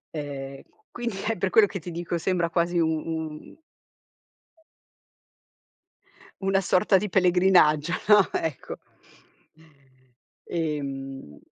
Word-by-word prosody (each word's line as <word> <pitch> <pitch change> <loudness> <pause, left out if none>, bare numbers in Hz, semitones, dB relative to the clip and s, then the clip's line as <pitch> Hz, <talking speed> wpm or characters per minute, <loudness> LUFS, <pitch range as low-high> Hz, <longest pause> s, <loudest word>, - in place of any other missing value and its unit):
ehm, 140 -2 -6 0.3
quindi 235 -5 -4
è 225 - -1
per 190 +1 0
quello 220 +1 +6
che 195 - -6
ti 175 - -8
dico, 170 +1 -3
sembra 175 0 0
quasi 170 0 0
u-un 160 - -3 2.8
una 195 0 +1
sorta 190 +2 +3
di 205 +1 -2
pellegrinaggio, 180 -4 +3
no, 210 -2 +6
ecco. 160 -4 -3 1.7
Ehm 135 - -5
170 Hz, 95 wpm, -25 LUFS, 150-190 Hz, 2.8 s, quello